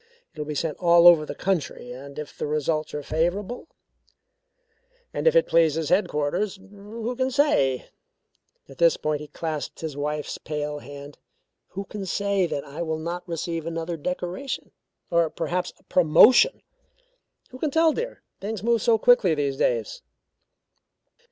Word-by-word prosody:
It - - -13
will 150 - -4
be 150 - -4
sent 155 +1 -2
all 170 -1 +5
over 165 -3 +8
the - - -5
country 170 -9 -2
and 140 +3 -10
if 150 -1 -7
the - - -3
results 155 +1 -1
are 150 - -4
favourable 185 - -2 1.5
and - - -1
it - - +5
pleases 160 -2 +2
headquarters 180 +1 0
who 205 +5 -7
can 260 +1 0
say," 245 - +2 0.8
at 135 - -15
this 170 -2 +5
point 150 -1 -2
he 150 - -8
clasped 155 0 -5
his 160 -3 -4
wife's 150 +1 -3
pale 150 -1 -4
hand, 140 +1 -11 0.5
"who 195 - -6
can 195 -1 -7
say 200 -1 +1
that 140 -3 -3
I 145 +4 -8
will 160 -2 -2
not 170 +3 -5
receive 165 0 -3
another 165 +1 -3
decoration, 180 - -4 0.4
or 170 -1 +3
perhaps 180 +2 -2
a - - -28
promotion? 215 - +5 0.9
Who 255 - -10
can 310 - 0
tell, 320 +2 +4
my - - -2
dear? - - -7 0.2
Things 210 +1 -5
move 230 -1 +2
so 225 +1 +4
quickly 220 -7 +4
these 140 -2 -1
days." 115 -5 0
170 Hz, 155 wpm, -25 LUFS, 150-200 Hz, 1.5 s, over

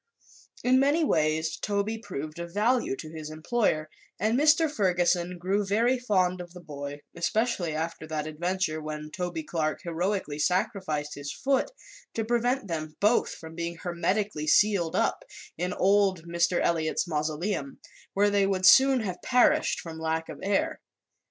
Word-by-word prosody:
In 255 +1 +4
many 290 +5 +3
ways 155 - +1
Toby 205 +2 -1
proved 155 -6 -6
of 170 0 -6
value 230 - +2
to 155 +3 -9
his 155 -1 -7
employer 155 0 0 0.3
and 215 +4 +1
Mr. 305 +4 +5
Ferguson 180 - +1
grew 190 +4 0
very 230 +6 +2
fond 185 -6 +1
of 175 0 -11
the - - -8
boy, 145 -3 -7
especially 175 -1 0
after 160 0 -4
that 155 -1 -3
adventure 155 +1 -2
when 150 0 -6
Toby 175 -2 -4
Clark 155 -1 -2
heroically 170 -2 -2
sacrificed 155 -3 -1
his 145 0 -6
foot 270 - 0 0.5
to 225 - -1
prevent 240 +1 0
them 155 -3 -4
both 210 +4 +3
from 160 0 -10
being 170 +1 -4
hermetically 175 0 -2
sealed 185 0 +3
up - - +1 0.3
in 180 +2 -2
old 195 -2 +2
Mr. 170 +1 +1
Eliot's 165 +1 0
mausoleum, 155 0 -2 0.4
where 205 +1 +3
they 200 -1 +3
would 185 -1 0
soon 265 +4 +7
have 185 -4 -4
perished 300 +5 +3
from 160 -1 -8
lack 160 0 -2
of - - -8
air. 310 +11 0
180 Hz, 150 wpm, -27 LUFS, 160-210 Hz, 0.5 s, soon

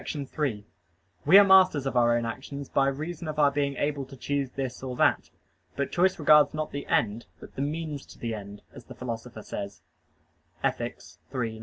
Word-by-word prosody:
3: 140 -7 -3 0.6
We 185 +6 +9
are 205 - +10
masters 185 -7 +5
of 135 - -2
our 120 -1 +4
own 120 - -2
actions 135 +4 -6
by 135 - +2
reason 155 +4 -4
of 155 -1 -4
our 145 -2 +5
being 140 -1 -1
able 145 -1 -1
to 135 +1 -12
choose 140 +1 -2
this 130 -1 -5
or 130 -1 -5
that. - - +2 0.5
But 140 -1 -2
choice 185 +2 +2
regards 150 -2 +5
not 155 0 -3
the 140 0 -6
end, 110 +1 0
but - - -12
"the - - -4
means 150 0 -4
to - - -14
the 115 -1 -3
end," 100 -1 -8
as - - -12
the - - -11
Philosopher 115 -2 -6
says 100 0 -7 0.8
(Ethic. - - -1 0.4
iii, 120 -3 -1
9). 110 - -10
140 Hz, 195 wpm, -27 LUFS, 120-150 Hz, 0.8 s, are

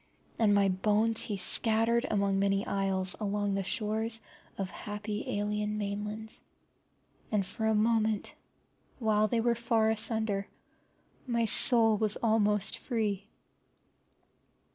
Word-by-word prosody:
And 210 -3 +3
my 200 -1 +3
bones 210 +4 0
he 205 - -4
scattered 225 +4 +2
among 200 -2 0
many 195 0 0
isles 190 -2 -1
and - - -15
along 205 -1 -2
the 195 0 -2
shores 220 +3 -1 0.4
of 190 -2 -5
happy 210 +2 -6
alien 210 0 -3
mainlands. 210 +2 -4 0.9
And 205 -3 0
for 220 +4 -4
a 220 - +1
moment, 220 -1 0 0.6
while 215 -3 +1
they 230 +2 -1
were 235 +1 +1
far 230 -1 0
asunder, 220 -2 -2 0.8
my 235 -2 0
soul 225 0 +8
was 215 -2 +3
almost 210 -2 0
free. 210 -5 -3
210 Hz, 120 wpm, -29 LUFS, 200-225 Hz, 0.9 s, soul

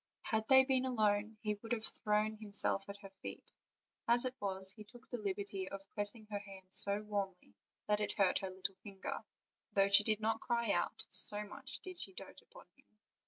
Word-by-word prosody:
Had 220 -2 -1
they 265 -1 +7
been 260 -1 +1
alone 215 -3 0
he 210 -1 0
would 225 +1 -3
have 225 -2 -3
thrown 210 +1 -1
himself 200 -2 -2
at 200 - -7
her 195 - -11
feet; - - +5 0.6
as 240 +2 +4
it 255 - -2
was, 190 -1 -5
he 215 - -11
took 235 +4 -17
the 245 -3 -6
liberty 200 -1 -4
of 195 0 -8
pressing 205 +2 +1
her 205 - -2
hand 195 -2 -13
so 200 +2 +6
warmly 200 -3 -5 0.3
that 210 0 +1
he 210 - -2
hurt 195 -3 +3
her 190 - -5
little 185 +1 -3
finger, 195 -2 -7 0.5
though 195 0 +3
she 200 +1 +6
did 215 0 +1
not 220 +1 -1
cry 235 -3 0
out, 175 -2 -1
so 210 0 +7
much 260 +6 -6
did 370 -2 -7
she 385 - +1
dote - - -11
upon - - -17
him. 270 -6 -30
210 Hz, 200 wpm, -35 LUFS, 200-225 Hz, 0.6 s, they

